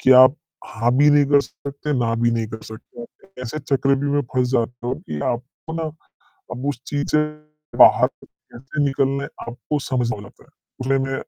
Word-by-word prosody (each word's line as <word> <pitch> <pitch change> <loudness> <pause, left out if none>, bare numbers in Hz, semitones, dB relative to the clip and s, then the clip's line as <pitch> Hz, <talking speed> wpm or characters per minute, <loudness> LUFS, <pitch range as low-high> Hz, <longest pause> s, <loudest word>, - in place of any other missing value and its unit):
कि - - +3
आप 130 +1 +8 0.3
हाँ, 115 +2 0
भी 145 +2 +6
नहीं 145 0 +5
कर 145 0 +5
सकते, 140 +1 -6
ना 115 -1 +1
भी 120 - +4
नहीं 115 -1 -1
कर 110 0 -8
सकते। 110 - -10 0.4
ऐसे 125 +5 -4
चक्रव्यूह 140 0 +1
में 145 - +2
फँस 125 -1 +2
जाते 120 -1 -1
हो 125 - 0
कि 75 - -7
आपको 125 +6 -4
ना 165 - -2 0.7
अब 125 +2 -5
उस 140 - -4
चीज़ 145 0 -2
से 150 - +4 0.5
बाहर - - +7 0.2
कैसे 135 +4 -6
निकलना 135 0 0
है, - - -6 0.2
आपको 130 +5 -3
समझना 125 -4 -1
पड़ता - - -20
है। - - -26 0.5
उसमें 135 0 -2
135 Hz, 180 wpm, -21 LUFS, 120-145 Hz, 0.7 s, आप